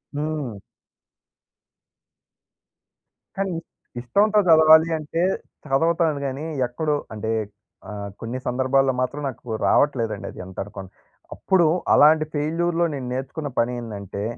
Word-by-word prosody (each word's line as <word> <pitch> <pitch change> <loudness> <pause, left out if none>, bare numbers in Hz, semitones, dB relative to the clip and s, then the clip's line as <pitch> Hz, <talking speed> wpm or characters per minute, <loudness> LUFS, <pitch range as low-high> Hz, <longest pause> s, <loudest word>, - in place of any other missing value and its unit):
హ్మ్. 145 -7 -3 2.8
కానీ 195 -2 -1 0.5
ఇష్టంతో 205 - +3
చదవాలి 160 0 +7
అంటే, 155 +2 -3 0.5
చదువుతాను 160 +2 +2
కానీ. 135 +3 -5 0.2
ఎక్కడో 150 +5 -1 0.2
అంటే, 110 +1 -3 0.6
ఆహ్, 100 -1 -6
కొన్ని 115 +3 -4
సందర్భాల్లో 130 +1 +2
మాత్రం 135 +3 -2
నాకు 115 -2 -6
రావట్లేదండి 115 -8 +1
అది - - -13
ఎంత 95 0 -13
అనుకున్న. 95 -2 -9 0.5
అప్పుడు 190 -3 +2 0.3
అలాంటి 155 +1 +6
ఫెయిల్యూర్‌లో, 165 +3 0
నేను 130 -3 -5
నేర్చుకున్న 140 +3 -4
పనేందంటే 110 -5 -3
140 Hz, 100 wpm, -23 LUFS, 120-160 Hz, 2.8 s, చదవాలి